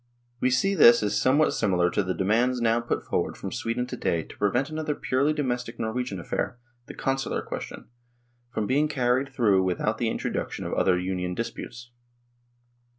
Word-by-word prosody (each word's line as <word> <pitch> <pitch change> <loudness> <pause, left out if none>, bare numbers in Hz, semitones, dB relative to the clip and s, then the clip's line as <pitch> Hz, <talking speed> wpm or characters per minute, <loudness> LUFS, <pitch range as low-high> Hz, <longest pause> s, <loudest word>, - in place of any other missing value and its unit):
We 130 - +2
see 160 +11 +2
this 120 - +7
is 105 - 0
some 130 +2 +3
what 155 - +3
similar 90 -4 +2
to - - +1
the 95 -1 -2
demands 120 +6 +2
now 115 0 +2
put 120 - -2
forward - - -2
from - - -6
Sweden 120 +2 -2
to 125 - -6
day 85 -1 -1
to - - -14
prevent 125 +8 +1
another 155 -1 -2
purely 140 +3 +1
do 150 -1 -1
mestic 120 -2 -3
Norwegian 110 -3 -3
affair 85 +7 -3 0.3
the - - -9
Consular 135 0 -1
question - - -7 0.6
from 110 -3 -2
being 145 +6 +2
carried 130 -1 +1
through 105 -8 +3
without 95 -2 -1
the - - +1
introduc - - -2
tion - - -6
of - - -3
other 90 - +3
Union 90 0 -2
disputes. 120 +2 -6
120 Hz, 185 wpm, -26 LUFS, 100-130 Hz, 0.6 s, this